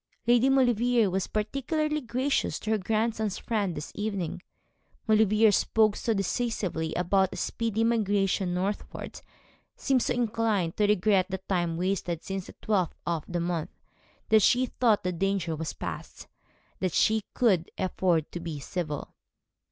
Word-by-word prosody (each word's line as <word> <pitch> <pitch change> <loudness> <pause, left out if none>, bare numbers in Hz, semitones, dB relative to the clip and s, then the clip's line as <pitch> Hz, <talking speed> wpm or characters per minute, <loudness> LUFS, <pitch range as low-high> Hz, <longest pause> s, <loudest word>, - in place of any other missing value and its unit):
Lady 240 +2 +4
Maulevrier 245 -4 +3
was 190 0 -1
particularly 300 +8 -1
gracious 260 +3 0
to 220 - -4
her 220 - +2
grandson's 220 0 -1
friend 205 -7 -1
this 150 - -6
evening. 200 -5 -3 0.7
Maulevrier 215 0 +5
spoke 215 +1 +3
so 235 - -1
decisively 195 -5 -1
about 190 +2 +2
a - - -7
speedy 225 -1 -1
migration 205 -5 +1
northward, 190 +3 -4 0.5
seemed 265 -2 +1
so - - 0
inclined 225 -7 0
to 210 - +2
regret 205 -2 +3
the 190 - -2
time 175 -3 0
wasted 180 -2 -2
since 195 -1 -4
the - - -12
twelfth 190 -6 +1
of 165 -3 -1
the 175 -1 -2
month, 170 -2 -2 0.6
that 220 0 +6
she 250 +6 +4
thought 230 -4 +1
the 180 - 0
danger 180 -2 -1
was 160 0 -4
past, - - -7 0.6
and 185 - 0
she 220 +4 +2
could 190 -9 +2
afford 180 -4 0
to 175 - -5
be 165 -3 -5
civil. 150 -1 -4
205 Hz, 145 wpm, -28 LUFS, 180-225 Hz, 0.7 s, that